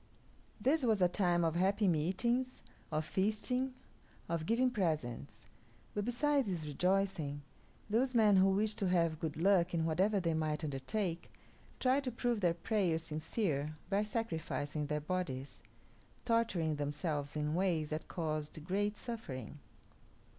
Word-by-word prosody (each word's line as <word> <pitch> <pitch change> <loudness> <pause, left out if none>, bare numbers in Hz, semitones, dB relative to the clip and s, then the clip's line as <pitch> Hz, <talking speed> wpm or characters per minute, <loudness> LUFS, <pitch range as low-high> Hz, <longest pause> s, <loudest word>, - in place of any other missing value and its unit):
This 275 +8 +2
was 225 -5 +2
a 180 - +5
time 175 -2 +2
of 165 - +1
happy 195 +4 +2
meetings, 225 +11 0 0.3
of 155 0 0
feasting, 235 +8 0 0.5
of 165 -1 -2
giving 250 +3 +3
presents; 145 - -2 0.5
but 205 -1 -1
besides 275 +2 +2
this 175 -5 -2
rejoicing, 165 -2 0 0.4
those 245 +4 +1
men 210 -4 +6
who 190 +1 +6
wished 210 +2 +1
to 195 - +1
have 165 -3 +2
good 160 -2 -3
luck 180 0 +3
in 165 -1 +1
whatever 190 +6 +2
they 170 -3 0
might 155 0 -1
undertake 165 +6 -2 0.5
tried 265 +2 +3
to 255 - -1
prove 240 -1 0
their 175 -4 +2
prayers 175 -4 0
sincere 155 -2 -2
by 200 +1 +3
sacrificing 160 - -2
their 150 0 -1
bodies, 145 -5 -3 0.6
torturing 195 -10 +1
themselves 145 0 -2
in 150 0 -1
ways 170 -4 +1
that 155 +1 -3
caused 155 -2 -3
great 205 +3 0
suffering. 150 - -6
180 Hz, 140 wpm, -35 LUFS, 155-215 Hz, 0.6 s, men